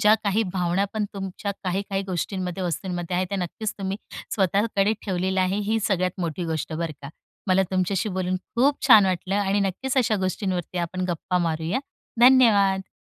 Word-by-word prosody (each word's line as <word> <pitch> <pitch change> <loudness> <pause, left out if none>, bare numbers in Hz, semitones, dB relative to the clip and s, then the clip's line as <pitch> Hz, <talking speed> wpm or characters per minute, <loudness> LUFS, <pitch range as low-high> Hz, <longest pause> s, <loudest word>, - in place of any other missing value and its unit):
ज्या 210 +1 +6
काही 205 +2 +2
भावना, 180 +1 +1
पण 215 -1 0
तुमच्या 195 +1 -4
काही, 185 +2 0
काही 195 0 0
गोष्टींमध्ये 185 +1 -3
वस्तूंमध्ये 175 0 -3
आहे. 185 - +1
त्या 200 - -2
नक्कीच 195 +4 -3
तुम्ही 195 0 -2 0.4
स्वतःकडे 200 +1 +2
ठेवलेल्या 190 -1 0
आहे. 185 +2 0
ही 225 - +2
सगळ्यात 185 -3 0
मोठी 170 0 -2
गोष्ट 160 -1 -3
बरं 165 0 -3
का. 140 - -6 0.4
मला 190 0 +4
तुमच्याशी 185 +2 0
बोलून 185 -1 -1 0.2
खूप 270 +4 +2
छान 220 -6 +8
वाटलं 185 +1 -1
आणि 200 0 +1
नक्कीच 200 +8 -2
अशा 225 -4 +2
गोष्टींवरती 185 -2 -3
आपण 180 +2 -2
गप्पा 175 +2 -1
मारूया, 160 +8 -1 0.4
धन्यवाद! 210 -7 +5
190 Hz, 165 wpm, -24 LUFS, 180-205 Hz, 0.4 s, छान